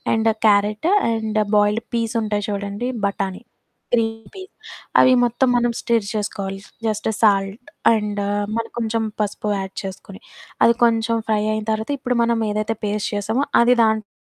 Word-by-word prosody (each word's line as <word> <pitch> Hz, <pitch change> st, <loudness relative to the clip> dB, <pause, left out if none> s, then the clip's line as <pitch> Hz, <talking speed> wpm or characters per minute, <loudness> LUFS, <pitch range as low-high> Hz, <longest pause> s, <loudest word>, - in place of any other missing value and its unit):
And 225 Hz, 0 st, +2 dB, 0.2 s
carrot, 210 Hz, -, +2 dB, 0.2 s
and 220 Hz, -1 st, -1 dB, 0.2 s
boiled 210 Hz, +2 st, +2 dB
పీసుంటాయి 220 Hz, -3 st, -1 dB
చూడండి 200 Hz, +4 st, -3 dB, 0.2 s
బఠాణీ. 195 Hz, 0 st, -3 dB, 0.5 s
Green 225 Hz, -1 st, 0 dB
peas 380 Hz, 0 st, -10 dB, 0.5 s
అవి 255 Hz, -, +6 dB
మొత్తం 240 Hz, +2 st, +1 dB
మనం 240 Hz, 0 st, +2 dB
స్టిర్ 230 Hz, -3 st, +1 dB
చేసుకోవాలి. 195 Hz, -2 st, -3 dB, 0.3 s
జస్ట్ 215 Hz, 0 st, -1 dB
సాల్ట్ 200 Hz, +1 st, +1 dB, 0.2 s
అండు 210 Hz, -2 st, -1 dB, 0.3 s
మనం 230 Hz, 0 st, -2 dB
కొంచెం 225 Hz, -1 st, -1 dB, 0.2 s
పసుపు 210 Hz, 0 st, -2 dB
యాడ్ 190 Hz, 0 st, -5 dB
చేసుకొని. 195 Hz, +1 st, -8 dB, 0.4 s
అది 235 Hz, -, +6 dB
కొంచెం 230 Hz, 0 st, +2 dB
ఫ్రై 210 Hz, -1 st, +2 dB
అయిన 215 Hz, -1 st, -3 dB
తర్వాత, 220 Hz, +3 st, -2 dB
ఇప్పుడు 250 Hz, -2 st, -1 dB
మనం 230 Hz, -1 st, +1 dB
ఏదైతే 215 Hz, +2 st, -1 dB
పేస్ట్ 205 Hz, 0 st, -2 dB
చేసామో, 220 Hz, +7 st, 0 dB, 0.2 s
అది 245 Hz, +1 st, +5 dB
దాంట్లో 220 Hz, -1 st, +1 dB
220 Hz, 145 wpm, -21 LUFS, 205-230 Hz, 0.5 s, అవి